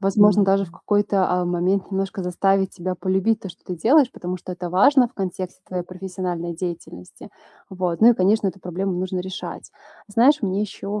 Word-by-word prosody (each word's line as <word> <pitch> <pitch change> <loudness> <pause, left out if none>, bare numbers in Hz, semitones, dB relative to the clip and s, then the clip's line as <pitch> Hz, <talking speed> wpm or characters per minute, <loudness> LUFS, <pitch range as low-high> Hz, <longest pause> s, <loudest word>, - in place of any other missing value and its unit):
Возможно, 205 +1 +5
даже 195 0 +2
в - - -15
какой-то, 205 +1 +1
а, 180 0 +1
момент 180 +3 0
немножко 195 +1 -3
заставить 190 +2 +1
себя 185 0 -3
полюбить 190 +4 0
то, 195 - -7
что 180 +2 -14
ты 180 - -5
делаешь, 255 - +4
потому 180 +1 -5
что 180 +1 -8
это 180 0 -5
важно 245 +8 +5
в - - -30
контексте 185 -1 -5
твоей 180 -1 -3
профессиональной 180 -1 -5
деятельности. 165 - -8 0.4
Вот. 180 -3 -2
Ну, 230 - +9
и - - +3
конечно 200 +1 +2
эту 190 +1 -8
проблему 185 +2 -3
нужно 185 +1 -2
решать. 190 +2 -7 0.4
Знаешь, 250 +7 +3
мне 195 0 0
еще 210 0 -4
190 Hz, 185 wpm, -22 LUFS, 180-200 Hz, 0.4 s, Ну